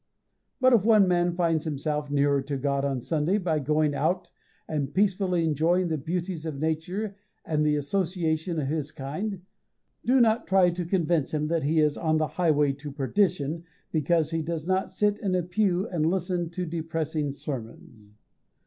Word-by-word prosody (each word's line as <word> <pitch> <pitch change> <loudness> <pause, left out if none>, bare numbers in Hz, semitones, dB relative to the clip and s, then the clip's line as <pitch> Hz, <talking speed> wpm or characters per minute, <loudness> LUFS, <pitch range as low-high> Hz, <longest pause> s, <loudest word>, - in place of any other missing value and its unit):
If 245 -6 +6
one 215 -3 +5
man 175 -1 +2
finds 165 -3 +1
himself 150 -1 -2
nearer 140 -1 +2
to 140 +1 -3
God 140 0 0
on 135 -3 -1
Sunday 160 - 0
by 170 -6 0
going 150 +1 +1
out 160 +6 -1 0.4
and 145 -3 -2
peacefully 185 -1 +1
enjoying 165 +4 +2
the 160 - 0
beauties 170 +2 -3
of 155 -4 -5
nature 175 +7 -2 0.3
and 150 -1 0
the 150 -1 +2
association 165 +1 -1
of 140 - -2
his 150 0 -2
kind, 180 +9 -5 0.6
do 260 +2 +4
not 225 -1 +3
try 190 -2 +4
to 175 0 -4
convince 170 -4 0
him 150 0 -1
that 165 -1 +1
he 155 +3 +1
is 150 -1 +2
on 160 -2 +1
the 155 - +2
highway 150 -5 +2
to 145 +1 -8
perdition 160 +2 0 0.3
because 160 0 +1
he 165 0 0
does 160 0 -4
not 190 0 +1
sit 205 +2 0
in 190 -3 0
a 180 - +1
pew 185 +2 0
and 160 -3 0
listen 175 -1 -1
to 180 +1 -4
depressing 160 -2 -2
sermons. 110 -6 -8
160 Hz, 170 wpm, -27 LUFS, 150-180 Hz, 0.6 s, If